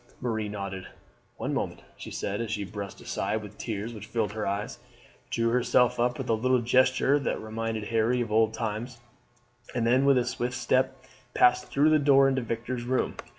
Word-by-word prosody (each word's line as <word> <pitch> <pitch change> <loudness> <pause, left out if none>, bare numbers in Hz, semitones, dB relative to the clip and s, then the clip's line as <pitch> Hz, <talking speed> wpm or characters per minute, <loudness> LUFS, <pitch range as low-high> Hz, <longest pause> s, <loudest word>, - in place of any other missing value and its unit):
Marie 110 -3 -2
nodded. 100 -2 -5 0.5
"One - - -3
moment," - - -3
she - - -9
said, 100 +3 -3
as 115 - -3
she 105 -1 -2
brushed 100 -1 -7
aside 110 0 -2
the 105 - -7
tears 110 +2 -5
which 105 -1 -9
filled 110 -2 -1
her 105 0 -3
eyes, 100 +2 -3 0.5
drew 115 0 +1
herself 125 0 +3
up 120 +1 +1
with - - -5
a - - +2
little 130 +3 +2
gesture 130 +3 +3
that 140 - -2
reminded 110 0 -3
Harry 115 +3 +1
of 115 -3 -2
old 110 0 +4
times, 110 +2 -4 0.8
and 120 -2 +1
then 130 +4 +4
with 140 -1 +5
a 125 - +2
swift 125 0 -2
step 130 +1 0 0.3
passed 125 0 +4
through 150 +3 +3
the 155 - +5
door 140 -1 +5
into 135 -1 +1
Victor's 120 +1 -3
room. 130 +1 0
115 Hz, 190 wpm, -28 LUFS, 110-125 Hz, 0.8 s, with